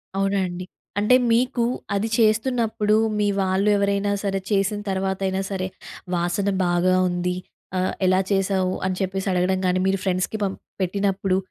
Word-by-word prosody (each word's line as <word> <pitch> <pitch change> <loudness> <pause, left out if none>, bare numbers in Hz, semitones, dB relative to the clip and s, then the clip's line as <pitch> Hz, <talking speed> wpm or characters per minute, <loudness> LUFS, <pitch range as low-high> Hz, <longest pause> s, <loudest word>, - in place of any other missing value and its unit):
అవునా 195 0 +1
అండి. 180 +1 -6 0.3
అంటే 215 +5 +5 0.2
మీకు 240 0 +2 0.3
అది 215 +3 0
చేస్తున్నప్పుడు, 220 -1 +2 0.2
మీ 205 - +2
వాళ్ళు 190 +2 +1
ఎవరైనా 200 0 +1
సరే 195 -1 0
చేసిన 200 +1 +1
తర్వాత 190 0 -1
అయినా 190 +1 -1
సరే. 185 -1 -2 0.5
వాసన 175 +4 0 0.2
బాగా 175 +1 +2
ఉంది 180 0 -1 0.4
ఆహ్, 185 0 0
ఎలా 185 +1 +4
చేసావు, 190 -1 +1
అని 185 -1 0
చెప్పేసి 190 0 -2
అడగడం 185 +1 +1
కానీ 180 0 +2
మీరు 195 0 +2
ఫ్రెండ్స్‌కి 185 +3 -1
పం 195 -1 0 0.3
పెట్టినప్పుడు, 195 0 0
195 Hz, 145 wpm, -23 LUFS, 185-200 Hz, 0.5 s, అంటే